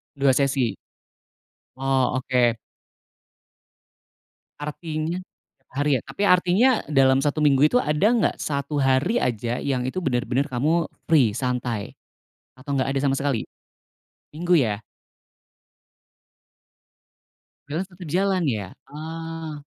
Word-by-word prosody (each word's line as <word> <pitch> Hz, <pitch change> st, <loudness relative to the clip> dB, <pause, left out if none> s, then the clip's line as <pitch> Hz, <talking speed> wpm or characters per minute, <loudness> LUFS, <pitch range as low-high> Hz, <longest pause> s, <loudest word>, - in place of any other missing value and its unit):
2 140 Hz, -1 st, +3 dB
sesi? 135 Hz, -5 st, +1 dB, 1.0 s
Oh 130 Hz, -1 st, +1 dB
oke. 125 Hz, -3 st, +2 dB, 2.0 s
Artinya 155 Hz, +3 st, -4 dB, 0.4 s
tiap -, -, -43 dB
hari 145 Hz, +2 st, 0 dB
ya? -, -, -12 dB
Tapi 205 Hz, -, -4 dB
artinya 180 Hz, +7 st, +4 dB, 0.2 s
dalam 135 Hz, -2 st, +4 dB
1 145 Hz, +1 st, 0 dB
minggu 145 Hz, 0 st, +4 dB
itu 245 Hz, -, +4 dB
ada 150 Hz, +5 st, +2 dB
nggak 235 Hz, -3 st, +2 dB
1 140 Hz, 0 st, -2 dB
hari 135 Hz, -, +2 dB
aja 120 Hz, 0 st, -1 dB
yang 130 Hz, -3 st, -1 dB
itu 185 Hz, +8 st, -3 dB
bener-bener 130 Hz, +2 st, 0 dB
kamu 155 Hz, +7 st, +1 dB, 0.2 s
free 135 Hz, -10 st, +4 dB
santai, 120 Hz, -3 st, -3 dB, 0.6 s
atau 140 Hz, +2 st, -7 dB
nggak 130 Hz, -, 0 dB
ada -, -, +2 dB
sama 135 Hz, -1 st, +2 dB
sekali? 140 Hz, -5 st, -1 dB, 0.9 s
Minggu 175 Hz, +3 st, +1 dB
ya? 110 Hz, -7 st, +1 dB, 2.9 s
Freelance 170 Hz, +7 st, -3 dB
tetap 180 Hz, -2 st, -10 dB
jalan 190 Hz, +1 st, +1 dB
ya? 100 Hz, -5 st, -4 dB, 0.2 s
Oh. 160 Hz, 0 st, -6 dB
140 Hz, 110 wpm, -24 LUFS, 130-165 Hz, 2.9 s, artinya